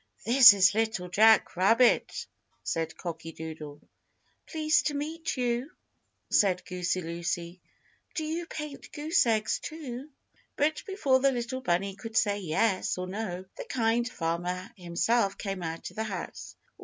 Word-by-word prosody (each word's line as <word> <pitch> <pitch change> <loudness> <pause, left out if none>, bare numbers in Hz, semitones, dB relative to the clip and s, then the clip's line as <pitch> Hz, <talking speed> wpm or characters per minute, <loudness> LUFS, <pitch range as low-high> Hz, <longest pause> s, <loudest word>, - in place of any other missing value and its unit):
"This 245 0 +9
is 195 -1 +4
Little 220 -4 -1
Jack 220 +4 +5
Rabbit," 225 +7 +3 0.4
said 160 -1 -3
Cocky 165 -2 -6
Doodle. 155 -2 -9 0.6
"Pleased 310 -1 +2
to 295 - -2
meet 320 +2 -3
you," 245 +2 -1 0.6
said 185 -3 +3
Goosey 180 0 -2
Lucy. 170 +1 -4 0.5
"Do 320 - -1
you 325 +2 -3
paint 300 -4 -7
goose 300 -3 +2
eggs, 220 -2 +1
too?" 285 -3 -7 0.5
But 305 +2 +1
before 285 -10 +2
the 275 +1 +3
little 245 +1 -3
bunny 195 -2 0
could 225 +2 -5
say 205 -3 +2
yes 190 +3 0
or 180 - -3
no, 185 -1 -5
the - - -6
Kind 235 0 0
Farmer 180 +1 -3
himself 195 +4 0
came 195 -3 -4
out 165 -1 -5
of - - -19
the 220 - -2
house. 190 -5 -6
215 Hz, 145 wpm, -28 LUFS, 180-260 Hz, 0.6 s, This